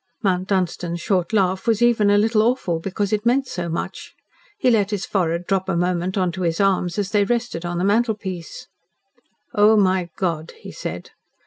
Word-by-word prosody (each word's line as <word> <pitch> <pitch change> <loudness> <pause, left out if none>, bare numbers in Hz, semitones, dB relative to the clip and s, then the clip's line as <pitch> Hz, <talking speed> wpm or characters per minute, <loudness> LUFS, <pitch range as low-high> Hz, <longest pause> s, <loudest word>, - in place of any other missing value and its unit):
Mount 185 -2 +1
Dunstan's 180 -3 -1
short 180 -1 0
laugh 190 -2 +1
was 225 -2 +3
even 235 -4 +3
a 205 - +5
little 215 +1 +3
awful, 220 -8 0
because 195 +4 -2
it 210 0 0
meant 255 +4 +2
so 175 -4 -4
much. 165 - -5 0.4
He 255 -11 +3
let 205 -3 +2
his 205 -3 -2
forehead 175 -3 -1
drop 190 0 -1
a 180 - 0
moment 180 +2 -1
on 185 -2 +1
to 185 +2 -6
his 165 -2 0
arms 190 -3 +1
as 200 -1 -2
they 205 -1 +3
rested 235 -5 -2
on 175 0 -3
the 175 - -1
mantelpiece. 200 -5 -1 0.9
"Oh, 215 0 +5
my 185 -3 +2
God!" 165 -4 -2
he - - -10
said. - - -7
190 Hz, 190 wpm, -21 LUFS, 175-210 Hz, 0.9 s, a